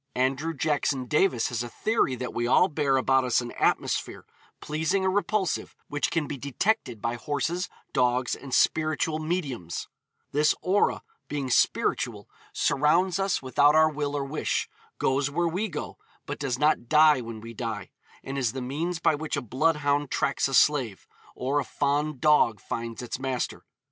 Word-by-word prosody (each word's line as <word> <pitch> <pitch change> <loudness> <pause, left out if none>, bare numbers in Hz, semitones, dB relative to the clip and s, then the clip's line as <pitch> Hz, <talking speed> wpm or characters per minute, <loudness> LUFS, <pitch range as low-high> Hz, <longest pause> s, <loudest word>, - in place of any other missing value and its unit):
Andrew 135 +6 0
Jackson 145 -3 0
Davis 150 -3 +2
has 120 -2 -2
a 120 - -5
theory 215 - 0
that 125 0 -5
we 120 0 -1
all 180 +8 +5
bear 145 -4 +1
about 135 0 +3
us 125 -2 +2
an 120 -1 -5
atmosphere, - - -1 0.3
pleasing 160 +6 -1
or 190 - +2
repulsive, 205 0 -1
which 145 0 0
can 165 -3 0
be 140 - -5
detected 140 - -1
by 115 - 0
horses, 145 +9 -2 0.2
dogs, 125 0 +1
and 135 - -7
spiritual 155 +2 +2
'mediums;' 145 - -3 0.4
this 150 +1 +3
aura, 195 +3 +2 0.2
being 140 -3 -3
spiritual, - - +1 0.2
surrounds 170 +6 +2
us 195 -6 0
without 145 +3 +4
our 155 0 +5
will 145 -1 -2
or 140 - -2
wish, 150 +3 -1 0.3
goes 135 +2 +1
where 170 +4 0
we 190 +6 -1
go, - - -6 0.3
but - - -5
does 135 -3 -1
not 150 -4 +1
die 150 -3 +6
when 115 -2 -7
we 115 +1 -9
die, 110 -4 -5 0.3
and 135 +1 -4
is 120 -5 0
the 135 - -4
means 155 +8 -2
by 165 - +2
which 150 0 -3
a - - +1
bloodhound 145 +3 +1
tracks 140 -2 0
a 135 - -1
slave, 130 -10 +2 0.3
or 135 +3 0
a - - -1
fond 145 0 -1
dog 135 -7 +4
finds 115 +4 -5
its 120 - -5
master. 130 -2 -3
145 Hz, 170 wpm, -27 LUFS, 125-155 Hz, 0.4 s, die